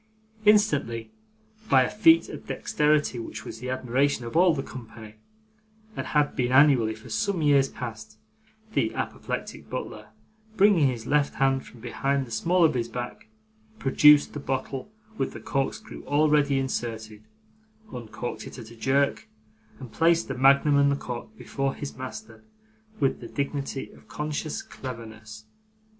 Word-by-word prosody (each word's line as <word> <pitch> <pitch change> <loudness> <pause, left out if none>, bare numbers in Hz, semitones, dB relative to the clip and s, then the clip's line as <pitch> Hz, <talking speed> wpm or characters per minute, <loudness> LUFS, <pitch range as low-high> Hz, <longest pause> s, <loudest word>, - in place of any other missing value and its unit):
Instantly, 150 - +3 0.6
by 130 -2 +6
a - - -1
feat 325 +10 +5
of - - -9
dexterity, 150 -4 +1
which 110 -1 -7
was - - -8
the 125 +2 -5
admiration 130 +1 0
of 115 - -7
all 175 -1 +5
the 135 - -3
company, 110 -4 -11 0.8
and - - -4
had 150 -1 +1
been, 125 -3 0
annually, 130 -5 +5
for 110 - -14
some 160 - 0
years 140 -2 +4
past, 110 -3 -8 0.6
the - - 0
apoplectic - - -5
butler, - - -6 0.5
bringing 195 -7 +5
his 120 -3 -3
left 145 +1 +1
hand 135 -1 +2
from 120 - -15
behind 135 +3 -1
the 120 - -14
small 170 +10 +3
of 160 - +3
his 120 -2 -1
back, 125 - -6 0.5
produced 150 -1 +5
the 150 - -5
bottle 135 +5 -4 0.3
with - - -1
the - - -8
corkscrew 135 +10 -3
already 145 -1 +3
inserted; 110 -5 -4 0.7
uncorked 120 0 -6
it - - -10
at 115 -2 -10
a - - -12
jerk; 135 +2 +1 0.5
and 130 -4 -9
placed 165 +5 +2
the 135 - -3
magnum 140 +3 +4
and 140 0 +4
the - - +2
cork 130 - -7
before 135 -1 -3
his 145 - -7
master 130 +14 -8 0.6
with 135 -2 +1
the 120 - -8
dignity 140 0 -4
of - - -19
conscious 150 0 -4
cleverness. 110 -3 -9
135 Hz, 150 wpm, -26 LUFS, 120-150 Hz, 0.8 s, by